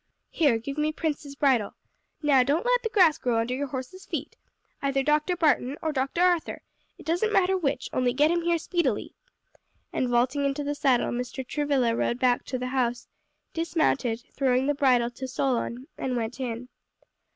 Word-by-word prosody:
Here, 285 -8 +3
give 275 +6 -5
me 305 +1 +1
Prince's 300 -3 -3
bridle. 260 -8 +2 0.5
Now 280 -3 +5
don't 290 - +1
let - - +3
the 450 - -2
grass 365 -8 +4
grow 240 -2 0
under 230 +2 -1
your 285 +2 -2
horse's 265 +8 -7
feet. - - -4 0.5
Either 275 -1 +1
Dr. 300 +5 +2
Barton, 295 -5 +1
or 315 - -1
Dr. 270 +4 -1
Arthur; 355 -3 +1 0.3
it - - -14
doesn't 350 +7 +1
matter 380 -2 +3
which; 320 -7 -1
only 250 -1 +2
get 295 +5 +3
him 345 0 +1
here 340 0 +1
speedily." 345 +1 -1 0.8
And 255 - 0
vaulting 250 +4 +2
into 280 +1 -1
the 290 0 -1
saddle 270 -4 +2
Mr. 250 +2 -4
Travilla 275 -6 +1
rode 235 - 0
back 250 -1 +2
to 255 - -3
the 250 0 -3
house, 245 -2 -1 0.5
dismounted, 310 -8 0
throwing 260 -1 +2
the 290 - +2
bridle 250 -4 +3
to 260 +2 -6
Solon, 255 -1 -1
and 255 -1 -2
went 235 +2 -3
in. 250 -1 -4
275 Hz, 175 wpm, -26 LUFS, 250-310 Hz, 0.8 s, Now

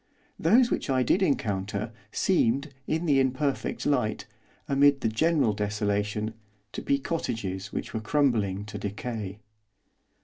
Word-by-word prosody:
Those 235 +9 +4
which - - -1
I 130 -1 +3
did 180 - +2
encounter, 105 - 0 0.2
seemed, 140 -5 +1
in 160 +2 0
the 140 -4 +4
imperfect 135 +2 0
light, 110 -7 0 0.4
amid 140 0 +4
the - - +1
general 140 +1 +2
desolation, 105 +1 -1 0.4
to - - -5
be 140 - +2
cottages 100 - -3
which - - -4
were 110 - -2
crumbling 110 -6 +1
to 105 -1 -7
decay. 105 0 -4
115 Hz, 130 wpm, -27 LUFS, 105-140 Hz, 0.4 s, Those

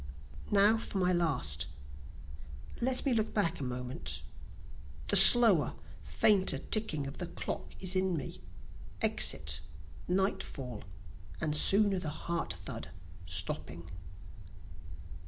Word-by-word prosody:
Now 210 +2 +3
for 210 - -7
my 180 -1 -1
last 125 - -2 1.1
let 255 +3 -3
me 270 - -1
look 220 -1 -4
back 175 -5 -1
a - - -7
moment; 125 0 -6 0.9
The - - +1
slower 225 -10 +9 0.3
fainter 200 -3 0
ticking 190 -10 -1
of 140 - -10
the 175 - -4
clock - - -7
is 185 0 -2
in 185 -2 -2
me, 140 - -9 0.6
Exit, - - +1 0.5
nightfall, 150 - -5 0.5
and 150 -1 -2
soon 200 +6 +5
the 160 - -6
heart 170 +2 -6
thud - - -9 0.4
stopping. 85 +2 -7
175 Hz, 110 wpm, -29 LUFS, 140-205 Hz, 1.1 s, slower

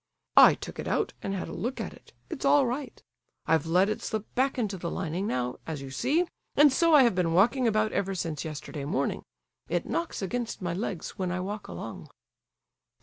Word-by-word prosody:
"I - - +9
took - - -9
it - - -4
out - - 0
and 195 - -3
had 185 - -4
a - - -7
look 250 +4 -3
at - - -4
it; - - -18 0.2
it's 325 - -6
all 280 0 +5
right. 250 +2 -4 0.4
I've 160 -1 +2
let 180 +4 +4
it 215 +2 -2
slip 220 -2 -3
back 265 +2 +1
into 210 -5 -1
the 175 -2 -4
lining 185 +3 -2
now, 125 0 -2
as 155 -4 -4
you 135 - -8
see, 280 - +1 0.3
and 290 -1 +6
so 330 +2 +5
I 280 - +8
have 235 - +4
been 175 -3 +1
walking 240 +7 +4
about 215 0 +2
ever 195 -1 -1
since 165 -5 -3
yesterday 150 -2 -6
morning; 165 +10 -1 0.5
it - - 0
knocks 335 -10 -2
against 235 +4 -3
my 175 -2 -2
legs 195 0 -4
when 185 -2 -1
I 185 - -2
walk 205 +3 -5
along." - - -7
200 Hz, 205 wpm, -28 LUFS, 170-245 Hz, 0.5 s, I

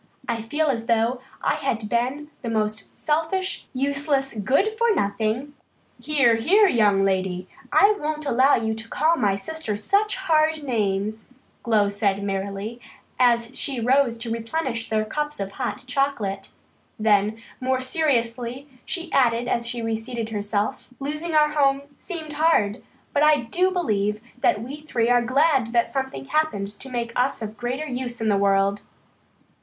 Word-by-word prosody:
I 230 -1 -1
feel 295 +8 -1
as 235 -6 -1
though 235 +2 +1 0.2
I - - +3
had 225 -2 -2
been 260 +7 -1
the 235 - -4
most 215 -1 -2
selfish, 325 +5 -1
useless, 275 +1 0
good 275 - +1
for 465 -1 +2
nothing 220 - -1 0.2
" - - -38
"Here, 270 -7 +3
here, 380 - +5
young 205 - +3
lady. 185 -1 -1 0.2
I 410 +1 +6
won't 305 0 -3
allow 265 +1 +4
you 220 -1 -1
to 220 0 -8
call 320 +2 +2
my 200 -6 +2
sister 220 0 -3
such 400 - +1
hard 315 -4 +2
names," 215 -3 -1 0.3
Glow 215 -4 +3
said 200 -1 0
merrily 200 +4 -4 0.4
as 235 0 +3
she 270 -2 -2
rose 250 0 +3
to 230 0 -5
replenish 230 +1 -3
their 215 -1 +1
cups 295 +4 -3
of 195 0 -3
hot 205 +1 -4
chocolate. 250 -7 -1 0.5
Then, 215 0 +2 0.2
more 260 0 0
seriously, 255 -2 -1 0.2
she 350 -2 -4
added 240 -2 +3
as 235 -1 0
she 235 -1 -4
reseated 225 +1 -3
herself: 210 +3 -2
"Losing 305 +4 -3
our 300 0 +5
home 280 -2 +2 0.2
seemed 320 -4 -6
hard, 290 -9 +2 0.3
but 290 - +2
I 300 -2 +5
do 350 +11 +1
believe 210 - 0 0.2
that 215 - +2
we 270 +5 -6
three 245 -6 0
are 245 0 +5
glad 260 +1 +3
that 235 -1 +2
something 270 0 -3
happened 280 -9 0
to 270 - -8
make 235 -2 -3
us 250 -1 0
of 215 0 -6
greater 250 +6 -3
use 245 -3 -4
in 220 -1 0
the 205 - +3
world." 200 0 +2
240 Hz, 160 wpm, -24 LUFS, 220-295 Hz, 0.5 s, I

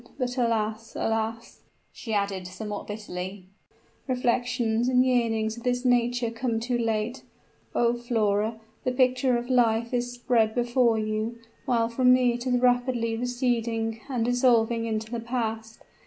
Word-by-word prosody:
But, 250 -2 -2
alas, 225 -2 -1
alas!" 225 +1 -2 0.3
she 230 - -7
added, 200 -3 -1
somewhat 205 +3 -6
bitterly, 190 -2 -6 0.6
"reflections 245 -2 0
and 255 0 +4
yearnings 225 -3 +1
of - - -8
this 245 0 0
nature 245 -1 +2
come 230 -1 -1
too 245 +2 -2
late! 225 +2 -1 0.5
O 235 0 +3
Flora! 220 -2 0 0.2
the 255 - 0
picture 255 -1 +3
of 240 0 -5
life 235 -2 +2
is 245 0 0
spread 235 -3 +1
before 240 -1 +2
you 215 +2 -2 0.3
while 235 -4 +2
from 250 +2 +4
me 250 -1 +3
it 240 +2 -5
is 250 -1 +2
rapidly 245 -2 +1
receding, 230 -2 -1
and 245 -4 0
dissolving 235 -2 +3
into 220 0 -3
the 235 - -2
past. 225 -2 -3
235 Hz, 140 wpm, -26 LUFS, 220-245 Hz, 0.6 s, and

